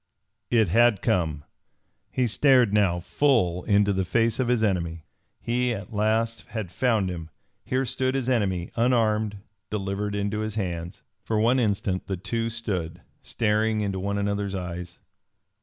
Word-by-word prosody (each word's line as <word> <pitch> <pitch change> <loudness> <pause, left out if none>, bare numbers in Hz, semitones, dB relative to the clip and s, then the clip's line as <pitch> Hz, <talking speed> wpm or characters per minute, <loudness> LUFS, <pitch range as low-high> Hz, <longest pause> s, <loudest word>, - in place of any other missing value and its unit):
It 110 -6 +3
had 115 +1 +4
come! 80 -5 0 0.7
He 130 - +1
stared 125 -1 +4
now 100 -5 +3
full 90 -4 +1
into 100 -1 +3
the 95 0 0
face 115 +5 +1
of 130 - +1
his 120 -2 +2
enemy! 85 -5 -1 0.3
He 120 0 0
at 100 +3 -8
last 110 +2 +1
had 110 -7 -5
found 110 -4 +1
him. 85 -2 -7 0.3
Here 130 +1 0
stood 130 +1 -1
his 130 -2 -1
enemy, 95 -8 0
unarmed, 110 -4 +1 0.3
delivered 100 0 -2
into 100 +1 -1
his 110 -1 -3
hands. 85 -4 -4 0.2
For 110 -1 -1
one 120 +4 +3
instant 100 -4 -1
the 95 -2 -2
two 115 +5 -2
stood, 90 -7 -4 0.2
staring 110 0 0
into 100 -2 -2
one 100 +2 -2
another's 100 -1 -1
eyes. 90 -1 -6
105 Hz, 150 wpm, -25 LUFS, 95-115 Hz, 0.7 s, had